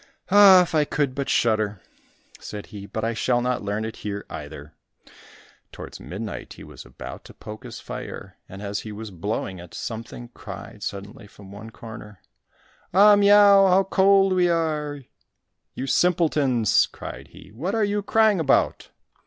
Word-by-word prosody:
"Ah, 195 Hz, -2 st, +8 dB
if 175 Hz, -, -7 dB
I 155 Hz, -1 st, +3 dB
could 145 Hz, -2 st, -1 dB
but 140 Hz, 0 st, -4 dB
shudder!" 110 Hz, -3 st, +1 dB, 0.6 s
said 105 Hz, -1 st, -8 dB
he, 100 Hz, -1 st, -8 dB
"but 110 Hz, -, -5 dB
I 115 Hz, +1 st, 0 dB
shall 120 Hz, +2 st, +1 dB
not 125 Hz, 0 st, -1 dB
learn 105 Hz, +2 st, -3 dB
it 110 Hz, -, -7 dB
here 100 Hz, -1 st, -5 dB
either." 75 Hz, 0 st, -9 dB, 1.0 s
Towards -, -, -10 dB
midnight 105 Hz, +4 st, -7 dB
he -, -, -13 dB
was -, -, -12 dB
about -, -, -10 dB
to -, -, -14 dB
poke 110 Hz, +4 st, -10 dB
his 120 Hz, -3 st, -9 dB
fire, -, -, -8 dB
and 95 Hz, +2 st, -9 dB
as 100 Hz, 0 st, -3 dB
he 110 Hz, -, -8 dB
was 105 Hz, 0 st, -8 dB
blowing 95 Hz, 0 st, -4 dB
it, 85 Hz, -1 st, -12 dB
something 115 Hz, +1 st, -7 dB
cried 100 Hz, -2 st, -10 dB
suddenly 100 Hz, +3 st, -7 dB
from 100 Hz, -1 st, -15 dB
one 110 Hz, +2 st, -10 dB
corner, 110 Hz, -3 st, -11 dB, 0.8 s
"Au, 205 Hz, +2 st, +8 dB
miau! 200 Hz, -1 st, +6 dB
how 190 Hz, +1 st, +4 dB
cold 195 Hz, 0 st, +3 dB
we 180 Hz, -1 st, +3 dB
are!" 150 Hz, -4 st, -1 dB, 0.7 s
"You 130 Hz, -, -4 dB
simpletons!" 145 Hz, -, +2 dB
cried -, -, -9 dB
he, -, -, -16 dB
"what 165 Hz, -, -3 dB
are 220 Hz, -, +1 dB
you 205 Hz, 0 st, -1 dB
crying 215 Hz, -1 st, +3 dB
about? 150 Hz, -4 st, +1 dB
120 Hz, 160 wpm, -24 LUFS, -, 1.0 s, Ah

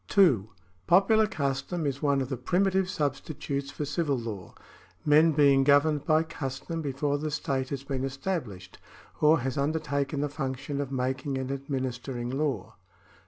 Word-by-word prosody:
(2) 135 Hz, -, +4 dB, 0.4 s
Popular 215 Hz, +4 st, +5 dB
custom 140 Hz, +1 st, -2 dB
is 140 Hz, -1 st, -2 dB
one 140 Hz, -2 st, +2 dB
of 130 Hz, -, -3 dB
the 135 Hz, -, -1 dB
primitive 185 Hz, +8 st, +1 dB
substitutes 140 Hz, -2 st, -3 dB
for 150 Hz, -, -4 dB
civil 145 Hz, -1 st, 0 dB
law, 110 Hz, -6 st, -6 dB, 0.5 s
men 155 Hz, +2 st, +6 dB
being 140 Hz, -2 st, +5 dB
governed 145 Hz, +1 st, +3 dB
by 155 Hz, 0 st, +4 dB
custom 160 Hz, +1 st, -5 dB
before 145 Hz, 0 st, -1 dB
the 155 Hz, +1 st, -2 dB
state 135 Hz, -3 st, -2 dB
has 140 Hz, -1 st, -4 dB
been 135 Hz, -1 st, -3 dB
established 135 Hz, -, -4 dB, 0.4 s
or 155 Hz, 0 st, +5 dB
has 130 Hz, +1 st, -2 dB
undertaken 140 Hz, -1 st, -1 dB
the 145 Hz, -, +1 dB
function 140 Hz, 0 st, -3 dB
of 140 Hz, -2 st, -5 dB
making 130 Hz, +1 st, -2 dB
and 130 Hz, 0 st, -3 dB
administering 130 Hz, -3 st, -3 dB
law. 140 Hz, 0 st, -2 dB
140 Hz, 150 wpm, -28 LUFS, 130-155 Hz, 0.5 s, men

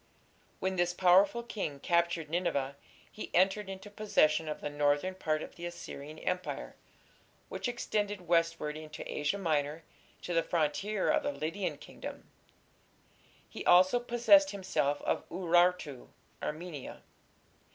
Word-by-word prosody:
When 190 Hz, 0 st, -1 dB
this 175 Hz, 0 st, +1 dB
powerful 190 Hz, +6 st, +5 dB
king 195 Hz, -11 st, -4 dB
captured 170 Hz, 0 st, +1 dB
Nineveh 145 Hz, -5 st, -1 dB, 0.4 s
he 215 Hz, -, -7 dB
entered 190 Hz, +3 st, +3 dB
into 195 Hz, +2 st, -8 dB
possession 160 Hz, -7 st, +2 dB
of 150 Hz, -, -4 dB
the -, -, -4 dB
northern 145 Hz, +5 st, +1 dB
part 155 Hz, -4 st, -1 dB
of -, -, -9 dB
the 175 Hz, 0 st, -5 dB
Assyrian 155 Hz, -3 st, -8 dB
Empire, 180 Hz, +2 st, -3 dB, 0.7 s
which -, -, -3 dB
extended 205 Hz, -4 st, -2 dB
westward 165 Hz, -3 st, +1 dB
into 155 Hz, 0 st, -8 dB
Asia 150 Hz, +7 st, -1 dB
Minor 155 Hz, -3 st, -1 dB, 0.4 s
to 175 Hz, -, -3 dB
the 165 Hz, -, +4 dB
frontier 180 Hz, +6 st, 0 dB
of 305 Hz, -, +2 dB
the 285 Hz, -, -1 dB
Lydian 180 Hz, -, -3 dB
kingdom; -, -, -10 dB, 1.2 s
he -, -, -7 dB
also 185 Hz, +6 st, +6 dB
possessed 245 Hz, +5 st, +5 dB
himself 185 Hz, -, -1 dB
of -, -, -1 dB
Urartu 175 Hz, -5 st, +2 dB, 0.3 s
(Armenia). 155 Hz, -2 st, -6 dB
175 Hz, 130 wpm, -31 LUFS, 155-195 Hz, 1.2 s, also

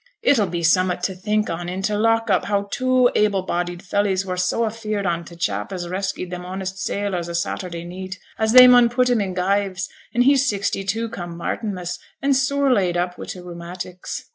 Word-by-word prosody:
'It 285 Hz, -, +5 dB
'll 205 Hz, -, +2 dB
be 170 Hz, -1 st, -3 dB
summut 185 Hz, +2 st, +2 dB
to 190 Hz, -, 0 dB
think 210 Hz, +3 st, -1 dB
on 175 Hz, +1 st, -4 dB
i' 185 Hz, +1 st, -4 dB
t' 210 Hz, +2 st, -1 dB
lock 225 Hz, +2 st, +2 dB
up 185 Hz, -, +2 dB
how 200 Hz, -1 st, 0 dB
two 255 Hz, -1 st, +3 dB
able 205 Hz, -3 st, +2 dB
bodied 175 Hz, -1 st, -2 dB
fellys 195 Hz, 0 st, 0 dB
were 185 Hz, -1 st, -3 dB
so 185 Hz, +5 st, 0 dB
afeared 215 Hz, -2 st, -3 dB
on 170 Hz, -2 st, 0 dB
t' 170 Hz, +1 st, -12 dB
chap 105 Hz, -11 st, -2 dB
as 180 Hz, -2 st, -4 dB
reskyed 185 Hz, 0 st, -3 dB
them 180 Hz, 0 st, -5 dB
honest 190 Hz, +1 st, -5 dB
sailors 185 Hz, -3 st, -2 dB
o' -, -, -5 dB
Saturday 170 Hz, 0 st, -3 dB
neet, 185 Hz, +2 st, -7 dB, 0.2 s
as 220 Hz, 0 st, +2 dB
they 250 Hz, 0 st, +11 dB
mun 245 Hz, -1 st, +7 dB
put 250 Hz, +1 st, +2 dB
him 235 Hz, -3 st, +2 dB
i' 200 Hz, -, -1 dB
gyves, 195 Hz, +1 st, 0 dB, 0.2 s
and 245 Hz, -, +3 dB
he 280 Hz, +3 st, +5 dB
sixty 205 Hz, -7 st, 0 dB
two 225 Hz, +4 st, -1 dB
come 175 Hz, -7 st, -7 dB
Martinmas, 180 Hz, -1 st, -3 dB, 0.2 s
and 275 Hz, 0 st, +2 dB
sore 275 Hz, 0 st, +2 dB
laid 180 Hz, -6 st, +1 dB
up 180 Hz, 0 st, -2 dB
wi' -, -, -6 dB
t' -, -, -6 dB
rheumatics.' 180 Hz, +1 st, -7 dB
190 Hz, 210 wpm, -22 LUFS, 180-220 Hz, 0.2 s, they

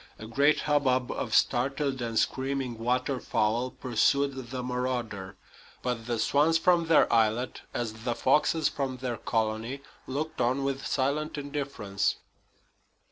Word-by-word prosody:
A 110 Hz, -, -9 dB
great 140 Hz, +7 st, +3 dB
hubbub 130 Hz, -4 st, +1 dB
of -, -, -2 dB
startled 135 Hz, +1 st, +1 dB
and 115 Hz, -1 st, -2 dB
screaming 130 Hz, -3 st, -1 dB
water 125 Hz, +3 st, 0 dB
fowl 115 Hz, +3 st, 0 dB
pursued 130 Hz, +2 st, 0 dB
the 130 Hz, 0 st, -4 dB
marauder; 125 Hz, -6 st, -3 dB, 0.5 s
but 120 Hz, -2 st, -2 dB
the 120 Hz, -1 st, -1 dB
swans 150 Hz, +7 st, +3 dB
from 170 Hz, 0 st, +3 dB
their 165 Hz, -, +5 dB
islet, 115 Hz, +2 st, +1 dB
as 120 Hz, -3 st, -3 dB
the 115 Hz, +2 st, -3 dB
foxes 150 Hz, +5 st, +3 dB
from 135 Hz, -2 st, -3 dB
their 125 Hz, -2 st, -3 dB
colony, 115 Hz, +4 st, -2 dB, 0.3 s
looked 145 Hz, +2 st, -3 dB
on 130 Hz, +3 st, +1 dB
with 135 Hz, 0 st, -2 dB
silent 145 Hz, +3 st, -1 dB
indifference. 140 Hz, -9 st, -2 dB
130 Hz, 135 wpm, -28 LUFS, 115-140 Hz, 0.5 s, their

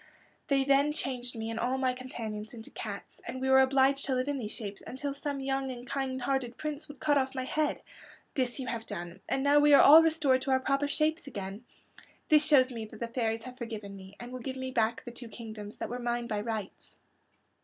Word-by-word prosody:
They 275 Hz, -1 st, +3 dB
then 280 Hz, +2 st, +3 dB
changed 250 Hz, -4 st, -2 dB
me 225 Hz, 0 st, -3 dB
and 225 Hz, -, -3 dB
all 250 Hz, +3 st, 0 dB
my 260 Hz, -1 st, +1 dB
companions 225 Hz, -4 st, -6 dB
into 225 Hz, -1 st, -10 dB
cats, 205 Hz, -3 st, -7 dB
and 250 Hz, +2 st, -4 dB
we 265 Hz, 0 st, -1 dB
were 265 Hz, -, +8 dB
obliged 270 Hz, +1 st, +3 dB
to 265 Hz, -, 0 dB
live 255 Hz, +1 st, 0 dB
in 285 Hz, -1 st, -1 dB
these 215 Hz, -3 st, -4 dB
shapes 200 Hz, -3 st, -6 dB
until 275 Hz, +2 st, -4 dB
some 280 Hz, 0 st, -4 dB
young 270 Hz, 0 st, -1 dB
and 245 Hz, -1 st, -7 dB
kind 260 Hz, 0 st, -2 dB
hearted 250 Hz, -2 st, -1 dB
prince 305 Hz, 0 st, -4 dB
would 290 Hz, -2 st, -11 dB
cut 290 Hz, -2 st, +3 dB
off 265 Hz, 0 st, -2 dB
my 260 Hz, -, -1 dB
head. 300 Hz, +3 st, -1 dB, 0.5 s
This 255 Hz, -1 st, -1 dB
you 260 Hz, -, -3 dB
have 230 Hz, -2 st, -4 dB
done, 175 Hz, +2 st, -6 dB
and 270 Hz, -, 0 dB
now 285 Hz, +1 st, +5 dB
we 290 Hz, 0 st, +7 dB
are -, -, +8 dB
all 310 Hz, +3 st, +10 dB
restored 305 Hz, -5 st, +3 dB
to 270 Hz, -, -4 dB
our 260 Hz, 0 st, +4 dB
proper 275 Hz, +2 st, +1 dB
shapes 310 Hz, +1 st, 0 dB
again. 200 Hz, -1 st, -6 dB, 0.6 s
This 300 Hz, -1 st, +6 dB
shows 265 Hz, -4 st, +5 dB
me 230 Hz, -2 st, -5 dB
that 215 Hz, -, -12 dB
the 235 Hz, -, -2 dB
fairies 225 Hz, -2 st, -1 dB
have 255 Hz, +1 st, -10 dB
forgiven 215 Hz, -4 st, -6 dB
me 190 Hz, 0 st, -12 dB
and 240 Hz, +1 st, -8 dB
will 255 Hz, -, -5 dB
give 260 Hz, +2 st, -5 dB
me 260 Hz, 0 st, -4 dB
back 230 Hz, -1 st, +1 dB
the 240 Hz, -, -6 dB
two 240 Hz, 0 st, -7 dB
kingdoms 215 Hz, -3 st, -8 dB
that -, -, -4 dB
were 245 Hz, +1 st, -4 dB
mine 240 Hz, 0 st, -1 dB
by 210 Hz, -3 st, -2 dB
rights." 215 Hz, -3 st, -5 dB
255 Hz, 230 wpm, -30 LUFS, 230-275 Hz, 0.6 s, all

